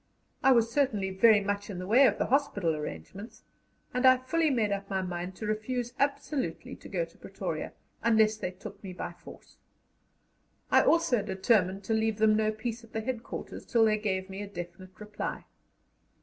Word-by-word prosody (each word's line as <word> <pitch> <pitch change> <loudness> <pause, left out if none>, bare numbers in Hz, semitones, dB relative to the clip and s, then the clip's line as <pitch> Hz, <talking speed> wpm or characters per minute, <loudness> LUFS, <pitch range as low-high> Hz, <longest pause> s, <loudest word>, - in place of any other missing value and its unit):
I 265 - +5
was 230 -2 +4
certainly 215 -9 +1
very 205 +2 +5
much 205 +1 -2
in 195 - -5
the 180 - -5
way 250 +7 +6
of 210 - +1
the - - 0
hospital 210 - +1
arrangements, 150 - -8 0.5
and 250 +1 0
I 255 0 +7
fully 315 +5 +1
made 225 -6 +1
up 200 0 -3
my 190 -1 -1
mind 180 +1 -5
to 215 - -6
refuse 235 +3 -2
absolutely 280 0 -2
to - - -12
go - - -1
to - - -22
Pretoria, - - -5 0.3
unless 220 -2 +4
they 215 - -3
took 185 +3 -11
me 190 -2 -6
by 175 - -5
force. 175 - -15 1.1
I - - +7
also 325 -9 +3
determined 195 -1 +1
to 225 - -1
leave 220 -1 +1
them 215 0 +4
no 215 0 +2
peace 230 +2 -5
at 230 - -17
the 220 - -1
headquarters 240 0 -5
till 230 -2 +3
they 215 -1 +2
gave 190 -3 -1
me 195 +1 -7
a 205 - -5
definite 185 0 -9
reply. 210 0 -5
215 Hz, 185 wpm, -29 LUFS, 190-240 Hz, 1.1 s, I